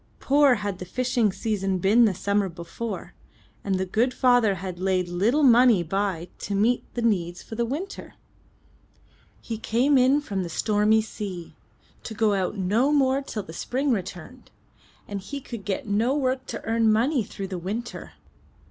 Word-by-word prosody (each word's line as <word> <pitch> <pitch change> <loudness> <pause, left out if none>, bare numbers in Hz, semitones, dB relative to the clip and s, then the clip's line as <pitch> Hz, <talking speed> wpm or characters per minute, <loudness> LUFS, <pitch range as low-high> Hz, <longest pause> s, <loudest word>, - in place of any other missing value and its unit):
Poor 280 -1 +4
had 205 -3 -4
the 180 - -6
fishing 240 +1 0
season 195 -2 -1
been 210 +6 +4
the 210 - +2
summer 200 +1 0
before, 180 +6 -6 0.5
and 195 -1 0
the 190 0 -1
good 230 +7 0
father 245 -5 +3
had 185 -1 -6
laid 185 -1 0
little 210 +12 +1
money 240 -6 +6
by 185 -1 -2
to 200 - -3
meet 230 +5 +1
their 240 - -2
needs 175 -6 0
for - - -11
the 235 +1 -1
winter. 315 +11 -6 1.3
He 225 -2 -5
came 255 +5 +2
in 260 +3 +4
from 200 -10 -3
the 175 - -4
stormy 215 +4 +2
sea, 195 -6 -7 0.5
to 220 - -7
go 215 -1 +2
out 195 +1 -1
no 215 +9 +2
more 270 -2 +3
till 220 -6 -5
the 160 - -11
spring 265 +10 -1
returned, 195 +3 -5 0.6
and 200 -1 -5
he 280 +9 -6
could 235 -6 -9
get 195 -1 -2
no 220 +6 +1
work 260 -1 -1
to - - -6
earn 225 -1 +2
money 245 +4 +2
through 195 -1 -7
the 185 -2 -4
winter. 215 +7 -6
215 Hz, 170 wpm, -25 LUFS, 190-245 Hz, 1.3 s, money